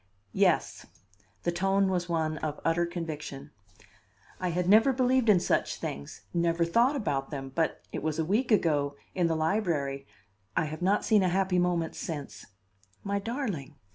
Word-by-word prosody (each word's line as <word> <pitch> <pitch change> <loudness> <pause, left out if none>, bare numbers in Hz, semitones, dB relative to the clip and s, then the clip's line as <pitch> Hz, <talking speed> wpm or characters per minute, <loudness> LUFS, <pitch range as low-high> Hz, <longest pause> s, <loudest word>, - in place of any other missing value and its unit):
"Yes." - - +1 0.6
The 175 - +1
tone 195 +2 +2
was 180 -2 -1
one 160 -2 -1
of 150 -1 -3
utter 170 +1 +2
conviction. 155 -5 -6 0.9
"I 185 - -1
had 175 +1 -1
never 220 +7 +6
believed 255 -2 +2
in 195 -4 +6
such - - 0
things 70 +1 -6
never 170 0 +2
thought 235 - +3
about 140 - -1
them, 135 -2 -6
but 165 +1 0
it - - -4
was 155 0 -2
a 160 - 0
week 225 +8 +1
ago 145 -8 +2 0.2
in 175 -2 +2
the 165 - 0
library 155 -6 -1 0.5
I - - +3
have 155 +2 -6
not 195 +3 +2
seen 215 -2 +4
a 185 - +2
happy 185 0 +1
moment 175 -2 0
since 150 -4 -6 0.3
" 95 0 -35
"My 200 0 -1
darling!" 210 - -4
170 Hz, 170 wpm, -29 LUFS, 155-195 Hz, 0.9 s, never